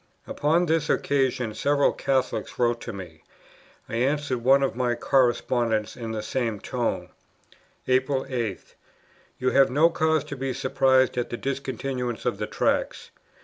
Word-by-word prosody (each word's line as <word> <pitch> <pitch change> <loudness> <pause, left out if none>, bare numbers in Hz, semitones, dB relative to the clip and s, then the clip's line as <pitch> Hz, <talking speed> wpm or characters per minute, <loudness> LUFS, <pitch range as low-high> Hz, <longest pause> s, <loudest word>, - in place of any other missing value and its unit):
Upon 160 +4 +1
this 160 -2 0
occasion 130 -5 0
several 145 +4 +2
Catholics 135 -2 -1
wrote 120 -1 +1
to 115 - -5
me; 90 -6 -10 0.7
I 115 - -4
answered 135 0 0
one 135 +2 +5
of 135 - -1
my 120 -1 0
correspondents 120 -3 +1
in 115 -2 -6
the 110 -1 -4
same 115 -2 -2
tone: - - -2 0.8
"April 130 +1 +1
8. 115 -7 -4 0.6
You 130 0 0
have 135 -1 +5
no 155 +6 +4
cause 160 -2 +1
to 145 - -7
be 135 -1 -3
surprised 130 -1 +2
at 120 - -2
the 120 - -4
discontinuance 130 -3 -3
of - - -1
the - - -2
Tracts. - - -1
130 Hz, 145 wpm, -25 LUFS, 120-140 Hz, 0.8 s, one